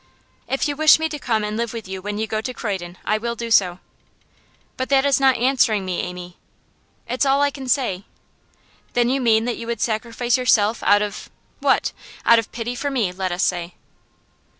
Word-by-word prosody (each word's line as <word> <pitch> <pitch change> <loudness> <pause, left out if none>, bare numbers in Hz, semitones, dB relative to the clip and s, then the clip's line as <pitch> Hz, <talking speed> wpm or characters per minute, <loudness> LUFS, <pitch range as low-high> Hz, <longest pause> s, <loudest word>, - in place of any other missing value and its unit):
'If 270 - 0
you 290 - -2
wish 310 +1 +6
me 320 0 -1
to 300 -1 -5
come 225 -5 0
and 210 0 -3
live 235 0 -2
with 225 -4 -7
you 190 0 -6
when 205 +1 -4
you 220 - -1
go 215 0 -2
to 250 +2 -5
Croydon 185 -5 -4
I 215 0 +1
will 235 +1 -3
do 235 0 -5
so.' 180 -5 +4 1.0
'But 260 - -3
that 275 0 +3
is 280 -1 +3
not 265 -1 +4
answering 235 -5 +2
me, 180 -1 -2
Amy.' 180 0 -6 0.7
'It's 250 +3 0
all 275 0 +3
I 285 - +2
can 270 -2 -8
say.' 230 -8 0 0.9
'Then 240 0 +2
you 270 0 0
mean 225 -2 +3
that 245 - -2
you 230 - -7
would 235 -2 -3
sacrifice 235 +2 0
yourself 225 -3 +2
out 205 +1 +4
of 205 -1 -6 0.3
what? - - +2 0.3
Out 235 0 +7
of 225 - -5
pity 235 +1 -4
for 285 +4 -3
me, 235 -9 0
let 185 0 -3
us 175 +1 -1
say. 175 -1 -1
230 Hz, 205 wpm, -21 LUFS, 205-255 Hz, 1.0 s, Out